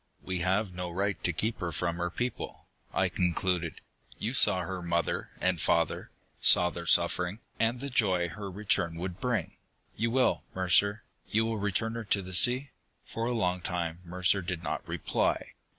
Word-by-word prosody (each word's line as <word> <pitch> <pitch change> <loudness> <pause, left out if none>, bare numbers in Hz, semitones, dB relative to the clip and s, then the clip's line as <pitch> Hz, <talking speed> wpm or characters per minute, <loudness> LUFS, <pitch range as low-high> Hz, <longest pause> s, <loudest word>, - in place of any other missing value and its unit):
"We 95 -1 -2
have 95 +2 +1
no 90 0 -3
right 100 +3 -2
to 85 - +3
keep 110 +7 -1
her 85 -1 -2
from 85 +2 -2
her 85 0 -1
people," 120 +7 -4 0.3
I - - +2
concluded. 90 -1 -1 0.4
"You 115 +4 -2
saw 105 -7 +4
her 90 +1 -4
mother 85 -1 -1
and 90 -3 +1
father, - - +1 0.3
saw 90 0 +6
their 85 0 -7
suffering, 90 +2 +3 0.2
and 115 +2 +1
the 140 +1 -5
joy 95 -8 +2
her 100 +1 -7
return 90 -4 0
would 90 +1 -5
bring. 125 -3 -2 0.4
You 115 +2 0
will, 125 +2 +2
Mercer 100 +3 +3 0.3
you 110 +1 +2
will 115 -1 -2
return 105 +3 -1
her 115 -1 -5
to 100 -1 +1
the 95 0 -8
sea?" 125 +8 +5 0.3
For 115 +1 -3
a - - 0
long 90 -6 0
time, 85 -2 -3
Mercer 90 +2 +2
did 85 -1 -4
not - - -4
reply. - - -1
95 Hz, 175 wpm, -29 LUFS, 85-110 Hz, 0.4 s, saw